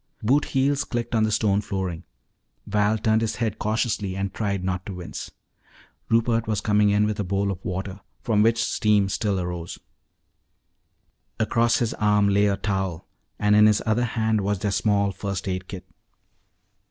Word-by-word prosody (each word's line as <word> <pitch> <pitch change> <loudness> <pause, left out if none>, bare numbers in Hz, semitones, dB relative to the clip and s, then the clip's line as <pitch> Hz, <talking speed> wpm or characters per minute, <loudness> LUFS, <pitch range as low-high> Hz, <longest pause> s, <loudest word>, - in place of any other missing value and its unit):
Boot 135 +7 +3
heels 140 +1 +1
clicked 120 0 -4
on 110 - +2
the 110 - -1
stone 105 -2 +2
flooring. 95 -5 -4 0.6
Val 105 +1 +1
turned 110 +1 +2
his 115 - -1
head 115 -3 -2
cautiously 105 -3 -1
and 95 0 -3
tried 100 -4 -2
not 90 -1 -2
to 95 -1 -7
wince. 90 -1 -7 0.8
Rupert 115 0 +2
was 110 -2 0
coming 105 0 +3
in 105 +1 +3
with 105 -1 -2
a - - 0
bowl 100 +1 -1
of 95 -1 -7
water, 95 +1 -4 0.2
from 110 -3 +2
which 115 +1 +3
steam 105 -4 +2
still 100 0 -1
arose. 90 -1 -5 1.6
Across 115 +1 +2
his 115 -2 -1
arm 105 -1 +2
lay 100 +1 +3
a 100 -1 0
towel 95 -5 -2 0.3
and 105 0 +3
in 105 0 +7
his 105 -1 +2
other 110 +2 +1
hand 110 -2 0
was 100 +1 0
their 100 +2 -2
small 100 -1 +1
first 100 0 -5
aid 90 -1 -3
kit. 95 -3 -8
105 Hz, 170 wpm, -24 LUFS, 95-110 Hz, 1.6 s, in